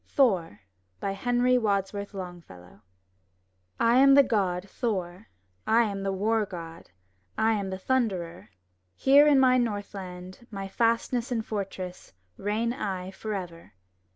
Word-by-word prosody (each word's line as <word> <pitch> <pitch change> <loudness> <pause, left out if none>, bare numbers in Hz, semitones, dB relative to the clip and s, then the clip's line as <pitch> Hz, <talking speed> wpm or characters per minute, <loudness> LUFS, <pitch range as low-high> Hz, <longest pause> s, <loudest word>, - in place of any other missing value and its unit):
THOR 180 - +2 0.4
Henry 245 +5 +1
Wadsworth 200 -1 -2
Longfellow 165 - -10 1.0
I 230 +1 +4
am 275 +1 +7
the 280 - +8
God 195 -6 -1
Thor, 190 -3 -4 0.4
I 230 +2 +5
am 200 -3 -3
the 195 0 -1
War 215 +3 +1
God, 170 -4 -9 0.5
I 220 +1 +3
am 200 -3 -2
the 190 - -4
Thunderer! 185 - -2 0.5
Here 285 +2 +6
in 285 -2 +5
my 255 -1 +5
Northland, 195 -2 -5
My 195 -2 -6
fastness 230 +3 0
and 225 -2 -1
fortress, 190 - -6 0.2
Reign 220 +4 -1
I 190 -6 -4
forever! 190 -5 -6
200 Hz, 125 wpm, -27 LUFS, 185-235 Hz, 1.0 s, the